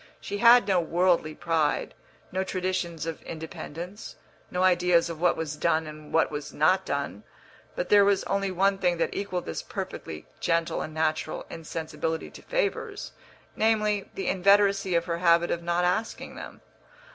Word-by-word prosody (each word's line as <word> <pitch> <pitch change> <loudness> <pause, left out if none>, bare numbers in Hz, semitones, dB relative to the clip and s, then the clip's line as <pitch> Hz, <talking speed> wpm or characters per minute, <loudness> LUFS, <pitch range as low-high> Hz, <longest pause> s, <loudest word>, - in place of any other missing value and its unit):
She 205 - -5
had 235 -1 +7
no 190 -3 +3
worldly 170 -2 +1
pride, 160 -3 0 0.4
no 190 +1 0
traditions 185 -4 -2
of 165 -1 -5
independence, 165 +4 -8 0.3
no 180 +1 -1
ideas 175 -2 +3
of 160 -1 -8
what 180 - +3
was 155 -2 -3
done 160 0 +1
and 155 0 -10
what 160 - +2
was 145 0 -5
not 185 +5 +2
done; 140 -7 -3 0.5
but 180 - -3
there 205 -1 +7
was 200 -1 +3
only 195 0 -1
one 195 +2 +1
thing 180 -2 +1
that 165 - 0
equalled 185 -3 -3
this 80 - -4
perfectly 80 -1 -6
gentle 165 -1 0
and - - -5
natural 155 0 -1
insensibility 160 0 -4
to - - -12
favours - - -2 0.4
namely, 215 -2 +1
the 195 - -4
inveteracy 195 0 +3
of 170 - -1
her 170 -1 -2
habit 170 -1 +4
of 170 - -1
not 175 +1 0
asking 215 +6 -2
them. - - -10
175 Hz, 160 wpm, -27 LUFS, 160-195 Hz, 0.5 s, had